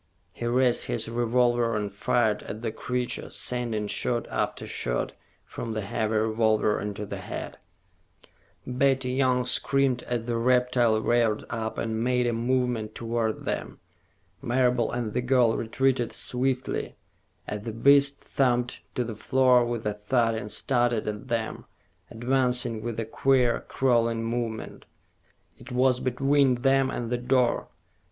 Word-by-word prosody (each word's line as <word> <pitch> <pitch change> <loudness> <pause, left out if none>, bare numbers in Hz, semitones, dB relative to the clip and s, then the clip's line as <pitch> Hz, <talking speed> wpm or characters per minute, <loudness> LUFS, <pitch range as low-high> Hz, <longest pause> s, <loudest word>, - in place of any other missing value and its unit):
He 120 - -4
raised 125 0 +2
his 115 -2 -2
revolver 120 0 +1
and 105 -2 -3
fired 110 0 +1
at 110 +3 -8
the 115 - -1
creature, 125 +2 -3
sending 120 -4 -2
shot 120 +3 -1
after - - -2
shot - - -2 0.3
from 115 - -6
the 110 - -2
heavy 110 +1 -2
revolver 110 -1 +2
into 105 0 -4
the - - -6
head. - - -7 1.1
Betty 130 0 +1
Young 130 -1 +2
screamed 135 0 +2
as 120 -2 -2
the 120 -1 -1
reptile 125 -2 +3
reared 115 -2 +1
up 110 -1 -3
and 110 0 -2
made 125 0 +1
a 120 - +1
movement 120 -2 -1
toward 115 -1 -2
them. - - -4 0.6
Marable 125 -1 +1
and 120 -3 -3
the 125 - 0
girl 125 -2 +3
retreated 120 +1 0
swiftly, 125 +2 -2 0.5
as 105 -1 -4
the 115 - -4
beast 140 +4 +4
thumped 125 -2 0
to 125 - 0
the 115 -1 -5
floor 125 +2 +3
with 120 -1 -3
a 105 - 0
thud 115 +3 +1
and 110 -1 -4
started 120 -3 +1
at 105 +3 -4
them, 115 -2 -3 0.4
advancing 125 -1 0
with 115 0 -4
a 115 - -2
queer, 125 +1 +2
crawling 115 -3 +1
movement. 115 -1 -4 0.7
It 130 - -12
was 125 0 +3
between 130 0 +2
them 135 -1 +3
and 120 -2 -4
the 125 - 0
door. 125 0 +1
120 Hz, 145 wpm, -26 LUFS, 115-125 Hz, 1.1 s, beast